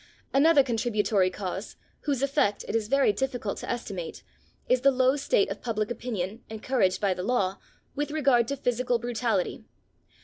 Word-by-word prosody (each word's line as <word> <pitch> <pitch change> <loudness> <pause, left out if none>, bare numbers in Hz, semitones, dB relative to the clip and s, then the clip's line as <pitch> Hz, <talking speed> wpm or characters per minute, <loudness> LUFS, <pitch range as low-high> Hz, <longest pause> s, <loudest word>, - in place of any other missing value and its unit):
Another 290 +1 +6
contributory 215 -5 +1
cause, 190 +1 -5 0.3
whose 275 -3 0
effect 275 -8 +1
it - - -3
is 220 -2 0
very 275 -4 +3
difficult 245 -2 -3
to - - -7
estimate, 190 -8 -5 0.4
is 255 -1 +3
the 275 - +6
low 260 0 +3
state 270 -9 +1
of 200 - -5
public 215 -2 -2
opinion, 220 -3 -4
encouraged 220 -3 0
by 200 -2 +2
the 180 - -5
law, 195 -3 0 0.4
with 290 +1 -2
regard 275 -6 +3
to 280 - -2
physical 245 -1 0
brutality. 230 -4 -1
235 Hz, 160 wpm, -27 LUFS, 205-265 Hz, 0.4 s, Another